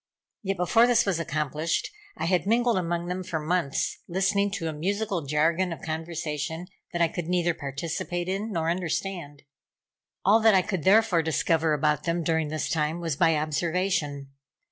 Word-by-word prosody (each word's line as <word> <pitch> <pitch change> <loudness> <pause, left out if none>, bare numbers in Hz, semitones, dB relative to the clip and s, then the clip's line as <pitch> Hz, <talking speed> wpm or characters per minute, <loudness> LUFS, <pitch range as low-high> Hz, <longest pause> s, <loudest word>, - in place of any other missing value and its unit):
Yet, 195 -1 -2
before 225 +7 +4
this 240 -1 +4
was 190 -4 0
accomplished, 155 +1 -1 0.3
I - - -2
had 180 +2 +1
mingled 235 +2 +3
among 170 -1 -2
them 180 +1 -3
for 175 -3 -3
months, 155 -2 -1
listening 195 +3 +1
to 175 -5 -2
a 160 - -2
musical 190 0 -2
jargon 165 +5 +2
of 165 - -7
conversation, 160 0 -4 0.3
that 175 -1 +1
I - - +4
could 165 0 -5
neither 175 -1 +1
participate 165 +4 -4
in, 200 +4 -2
nor 165 -3 0
understand. 170 -4 -3 0.8
All 210 +4 +6
that 220 -2 +5
I 185 - +4
could 185 -6 -3
therefore 200 -3 +5
discover 160 0 +1
about 150 0 +1
them 170 0 0
during 160 -1 +1
this 155 +1 -2
time, 155 +1 -1
was 165 -4 -2
by 165 +3 +3
observation. 155 -2 -1
170 Hz, 165 wpm, -26 LUFS, 155-185 Hz, 0.8 s, All